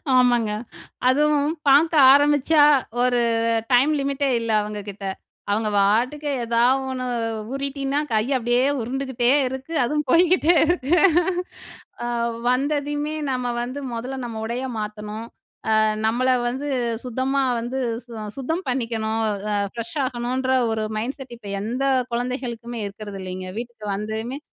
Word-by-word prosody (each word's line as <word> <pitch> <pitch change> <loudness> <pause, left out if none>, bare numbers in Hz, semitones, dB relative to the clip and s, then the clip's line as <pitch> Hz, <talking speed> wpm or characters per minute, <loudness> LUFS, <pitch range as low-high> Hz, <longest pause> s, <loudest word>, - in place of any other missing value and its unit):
ஆமாங்க. 240 -3 +3 0.6
அதுவும் 295 +1 +3 0.2
பார்க்க 310 +5 +5 0.2
ஆரம்பிச்சா, 290 +1 +4 0.4
ஒரு 250 -1 +3 0.5
டைம் 260 +5 +5
லிமிட்டே 275 0 0
இல்ல 230 -1 -2
அவுங்ககிட்ட. 205 -1 -7 0.5
அவுங்க 215 +1 +1
பாட்டுக்கு 245 +9 +2
எதா 230 0 +2 0.3
ஒன்னு 255 -1 -3 0.5
ஊறிட்டின்னா 275 +1 -2
கைய 225 +5 +1
அப்பிடியே 240 +1 +1 0.2
உருண்டுகிட்டே 250 0 -1 0.2
இருக்கு. 265 +5 -6
அதுவும் 300 +5 0
போய்க்கிட்டே 350 0 +4
இருக்கு. 340 -1 +1 1.1
ஆ - - -2 0.4
வந்ததையுமே 290 +3 0 0.2
நம்ம 250 -2 -1
வந்து 255 +4 -4
மொதல்ல 250 +4 -4
நம்ம 225 -2 -5
உடைய 245 +3 -3
மாத்தணும். 210 +1 -5 0.5
அ - - +5 0.3
நம்மள 245 +3 +1 0.2
வந்து 270 +4 -4 0.4
சுத்தமா 260 +3 0 0.2
வந்து 245 +3 -3 0.3
சு-சுத்தம் 245 - -4
பண்ணிக்கணும். 225 -3 -1 0.3
அ 205 - +1 0.2
ஃப்ரெஷ்ஷாகணுன்ற 255 +1 -2 0.2
ஒரு 220 -1 -1
மைண்ட் 250 +6 -3
செட் 255 -3 -9
இப்ப 210 - -10
எந்த 240 +5 -3 0.3
கொழந்தைகளுக்குமே 240 -1 -3
இருக்கிறது 200 -1 -8
இல்லேங்க. 185 0 -6
வீட்டுக்கு 235 -2 -7
வந்துமே 220 +6 -4
250 Hz, 115 wpm, -23 LUFS, 225-275 Hz, 1.1 s, பார்க்க